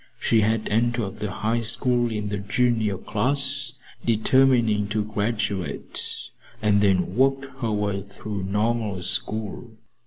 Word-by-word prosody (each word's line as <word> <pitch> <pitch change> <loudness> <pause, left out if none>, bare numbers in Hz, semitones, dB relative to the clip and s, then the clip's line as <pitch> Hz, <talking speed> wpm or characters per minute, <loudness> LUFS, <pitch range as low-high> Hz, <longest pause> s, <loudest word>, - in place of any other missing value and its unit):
She 115 -2 +3
had 110 +1 +1
entered 115 -2 0
the 105 - -2
High 110 +5 -1
School 120 +1 +1
in 105 -1 -3
the 100 -1 -2
junior 110 -1 +1
class, 135 +5 0 0.3
determining 115 -2 +3
to 105 0 -1
graduate 105 -6 -2 0.6
and 105 -1 +3
then 100 -2 +4
to 90 - +1
work 135 +5 0
her 115 -4 -1
way 105 -2 -1
through 100 0 -6
Normal 105 -1 -1
School. 110 +4 -2
110 Hz, 130 wpm, -24 LUFS, 100-120 Hz, 0.6 s, then